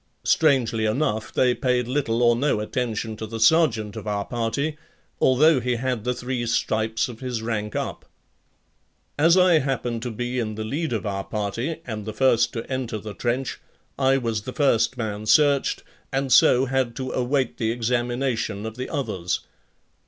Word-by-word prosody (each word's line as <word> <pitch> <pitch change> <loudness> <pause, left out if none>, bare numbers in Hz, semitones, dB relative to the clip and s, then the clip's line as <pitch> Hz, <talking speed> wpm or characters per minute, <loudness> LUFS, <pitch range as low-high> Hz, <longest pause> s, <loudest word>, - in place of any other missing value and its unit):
Strangely 125 -8 +2
enough, 110 -1 -1
they 125 -1 +3
paid 125 -2 0
little 125 -3 0
or 120 0 +5
no 135 -2 +1
attention 110 0 -3
to 110 - -5
the 115 +1 -6
sergeant 115 -5 +3
of - - -7
our 100 -1 -1
party, 125 +6 -2 0.4
although 140 +3 +5
he 125 0 -1
had 125 -2 -2
the 125 - +1
three 125 0 -3
stripes 110 0 0
of 120 -3 -9
his 125 -4 -4
rank 105 -2 -3
up. - - -4 1.1
As 165 +4 +5
I 180 -3 +5
happened 125 -4 -2
to 125 - -3
be 120 +2 -3
in 110 -2 -3
the 110 - -4
lead 150 +8 -2
of 110 -3 -2
our 100 -1 -2
party 110 +11 -3
and 110 -4 -5
the 110 - -4
first 120 -1 +3
to 115 - -4
enter 130 -4 -3
the 105 0 -7
trench, 125 +3 -2 0.4
I 135 0 +4
was 115 -4 -2
the 125 +4 -7
first 125 -4 +2
man 110 -2 -4
searched 145 +1 +3 0.3
and 135 -1 0
so 125 +1 +6
had 130 -3 -1
to 130 -1 -4
await 130 0 0
the 110 - 0
examination 120 -2 -1
of 110 +1 -6
the 130 - -4
others. 105 - -2
120 Hz, 175 wpm, -24 LUFS, 110-130 Hz, 1.1 s, so